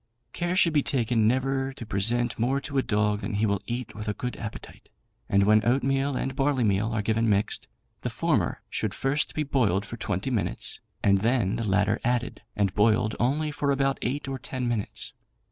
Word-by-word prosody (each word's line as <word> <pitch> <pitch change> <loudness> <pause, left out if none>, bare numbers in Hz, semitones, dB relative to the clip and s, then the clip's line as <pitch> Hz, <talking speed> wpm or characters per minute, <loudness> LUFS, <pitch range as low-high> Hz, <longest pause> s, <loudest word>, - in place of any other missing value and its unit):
Care 175 +1 -1
should 170 -3 +4
be 150 - +4
taken 115 -5 +1
never 135 +2 +1
to 120 - -8
present 115 +4 +1
more 130 +4 +2
to 140 0 -2
a - - +4
dog 105 -2 +1
than 105 0 -3
he 105 +2 +2
will 100 -2 0
eat 120 0 -4
with 105 0 -7
a 105 - -1
good 125 0 -4
appetite; 110 -2 -8 0.4
and 100 0 +4
when 105 +1 +5
oatmeal 135 +3 +1
and 135 +1 -2
barleymeal 120 -7 +1
are 110 -2 -1
given 115 +1 +1
mixed, 100 0 0 0.3
the - - -2
former - - 0
should - - -2
first 140 +2 0
be 155 - +1
boiled 110 -9 +1
for 120 - -7
twenty 105 +4 -2
minutes, 110 -5 -2 0.2
and 100 -1 +4
then 115 -2 +1
the 115 - -2
latter 105 +1 +2
added, 120 0 -1
and 100 -2 +1
boiled 110 +1 +3
only 150 +6 +1
for 145 -1 -1
about 135 0 +1
eight 135 +3 -2
or 135 -1 -3
ten 130 -2 -4
minutes. 115 -4 -3
120 Hz, 195 wpm, -27 LUFS, 105-135 Hz, 0.4 s, when